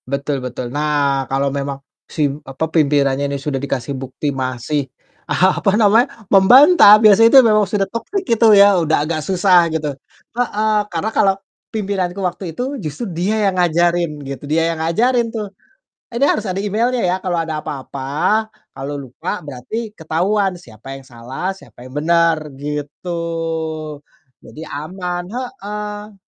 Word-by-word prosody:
Betul 140 0 -2
betul, 125 -1 -6
nah, 145 -3 0
kalau 135 +1 0
memang 140 -1 -3 0.3
si, 145 -1 -1
apa, 135 +2 -4
pimpinannya 140 -3 +2
ini 140 - -2
sudah 135 -1 -3
dikasih 140 -1 -3
bukti 135 +2 -4
masih, 130 +2 -3 0.4
apa 190 +2 +2
namanya, 225 +1 +2
membantah 215 - +8
biasanya 215 +1 +6
itu 270 - +8
memang 215 -2 +4
sudah 195 0 0
toxic 230 - -4
itu 230 - +3
ya, 200 -2 +6
udah 155 -2 +1
agak 155 0 -2
susah 180 0 +3
gitu. 155 -2 -2 0.4
Heeh, 220 -2 0 0.2
karena 175 +5 -2
kalau 195 -1 +3 0.4
pimpinanku 195 -4 -2
waktu 180 +2 -3
itu, 265 0 -3
justru 155 +5 -5
dia 205 +6 0
yang 185 -2 +1
ngajarin 175 0 +2 0.2
gitu, 135 -1 -7
dia 165 +2 +1
yang 160 - -6
ngajarin 230 +9 +1
tuh. 210 -3 -6 0.6
"Ini 245 +4 +2
harus - - 0
ada 185 +1 -2
emailnya 230 +4 0
ya, 180 0 +1
kalau 185 -2 -2
ada 160 -1 -4
apa-apa, 145 +10 -2 0.2
kalau 140 +2 -6
lupa, 145 - -6
berarti 150 - -6
ketahuan 190 +3 -1
siapa 135 -5 -11
yang 135 - -11
salah, 130 +8 -5
siapa 130 - -14
yang 130 - -12
benar." 165 -1 +2
Gitu. 150 +4 -6 1.3
Jadi 155 - -12
aman, 175 +4 -4
heeh. 210 -3 -6
170 Hz, 145 wpm, -18 LUFS, 140-210 Hz, 1.3 s, membantah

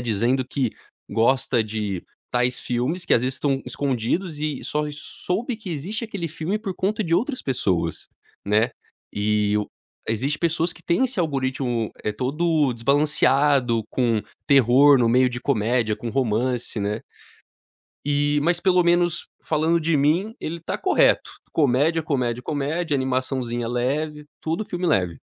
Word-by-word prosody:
dizendo 120 +3 +1
que 130 -3 -1 0.4
gosta 120 0 +2
de 105 -4 -4 0.3
tais 125 0 +1
filmes, 130 +9 -1
que - - 0
às - - +4
vezes 130 +1 0
estão 135 0 0
escondidos 145 +6 -2
e 150 -3 -2
só 150 0 -1
soube 215 - -4
que 215 -4 -8
existe 190 - -3
aquele 195 -7 -4
filme 165 +6 -2
por 205 -3 -4
conta 210 +3 0
de 165 - +1
outras 255 +6 -2
pessoas, 95 - -1 0.4
né. 110 +4 +3 0.4
E 105 0 +1
o 105 - -2 0.4
existe 135 +7 -1
pessoas 170 0 +1
que - - -17
têm 175 +10 +2
esse 235 -5 -6
algoritmo, 130 -7 -1
eh, 105 - 0
todo 145 +3 +1
desbalanceado, 140 -1 +3
com 115 -4 +1 0.3
terror 135 +1 +6
no 120 - +3
meio 125 +2 +4
de 120 - -5
comédia, 110 0 +1
com 115 - -5
romance, 125 -1 0
né. 105 +2 -2 1.1
E 145 0 +2
mas 175 +2 +2
pelo 180 -1 +3
menos, 175 0 +2
falando 160 +2 +1
de 160 0 +1
mim, 165 +10 +1
ele 165 +1 -4
tá - - -3
correto, 380 - +3 0.2
comédia, 150 +3 +2
comédia, 125 -5 -1
comédia, 150 +3 -1
animaçãozinha 130 -2 -1
leve, 150 +5 -2
tudo 165 +7 -2
filme 180 -2 -3
leve. 90 - +1
135 Hz, 145 wpm, -23 LUFS, 120-165 Hz, 1.1 s, terror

